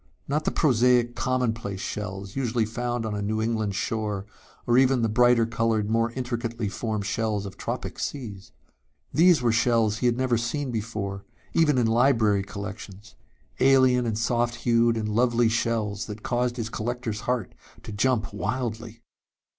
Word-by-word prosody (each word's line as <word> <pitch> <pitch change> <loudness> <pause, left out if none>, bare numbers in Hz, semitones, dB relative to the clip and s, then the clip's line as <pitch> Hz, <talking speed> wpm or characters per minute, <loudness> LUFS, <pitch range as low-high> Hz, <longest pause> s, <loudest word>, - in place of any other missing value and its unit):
Not 150 +2 -1
the - - +1
prosaic 125 -3 +3
commonplace 115 -6 -1
shells 100 -1 -5
usually 120 -4 0
found 120 +1 -3
on 110 - -3
a 105 - -3
New 110 +2 -1
England 110 -3 -1
shore 105 -2 -2 0.4
nor 120 +1 +4
even 130 -2 +3
the 115 - +2
brighter 120 +1 +4
colored, 115 -2 0
more 115 +1 +1
intricately 120 -3 -3
formed 110 0 -3
shells 105 0 -1
of 100 -1 -8
tropic - - -5
seas. 105 -9 -5 0.6
These 170 -4 +5
were 120 - +3
shells 115 -1 +2
he 125 - +2
had 120 0 +1
never 125 -3 +1
seen 130 +3 -2
before, 105 -3 -4 0.3
even 150 -4 +3
in 120 - +3
library 115 -3 +3
collections. 100 0 -8 0.5
Alien 130 -2 +4
and 110 -2 -1
soft 120 +1 0
hued 115 -1 +2
and 110 -1 -2
lovely 120 +1 +2
shells 110 -3 -1
that 105 0 -8
caused 125 0 -1
his 115 -2 -3
collector's 120 -1 -3
heart 125 -6 -1 0.3
to - - -8
jump 110 +1 0
wildly. 115 0 -4
115 Hz, 155 wpm, -25 LUFS, 105-125 Hz, 0.6 s, These